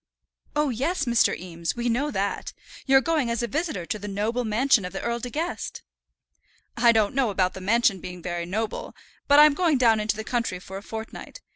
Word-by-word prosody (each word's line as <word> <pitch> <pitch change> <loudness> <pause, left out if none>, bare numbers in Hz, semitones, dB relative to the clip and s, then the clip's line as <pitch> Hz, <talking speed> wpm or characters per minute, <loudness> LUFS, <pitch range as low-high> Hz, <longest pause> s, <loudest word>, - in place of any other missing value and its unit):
"Oh, 300 -1 +2
yes, 280 +7 -1
Mr. 240 -2 +3
Eames, 170 -2 -4
we 240 0 -2
know 255 +6 0
that. 200 -6 -2 0.3
You're 270 0 +6
going 305 -5 0
as 235 0 -1
a - - 0
visitor 300 - -2
to 215 - -3
the 205 - -7
noble 215 +5 -1
mansion 230 +1 +3
of 180 +1 -6
the 195 - -4
Earl 235 0 -1
De 245 - -5
Guest." 325 +7 -4 0.9
"I 235 0 +5
don't 220 -3 +2
know 260 -3 +2
about 185 -2 +1
the 190 - -8
mansion 215 0 +2
being 180 0 -8
very 175 -1 -3
noble, 215 +4 -4 0.3
but 285 - +6
I'm 300 -1 +8
going 325 -2 +2
down 230 -3 +4
into 215 0 0
the 220 - -5
country 230 -5 -2
for 190 +1 -9
a - - -7
fortnight. 220 +1 -8
230 Hz, 210 wpm, -25 LUFS, 200-265 Hz, 0.9 s, I'm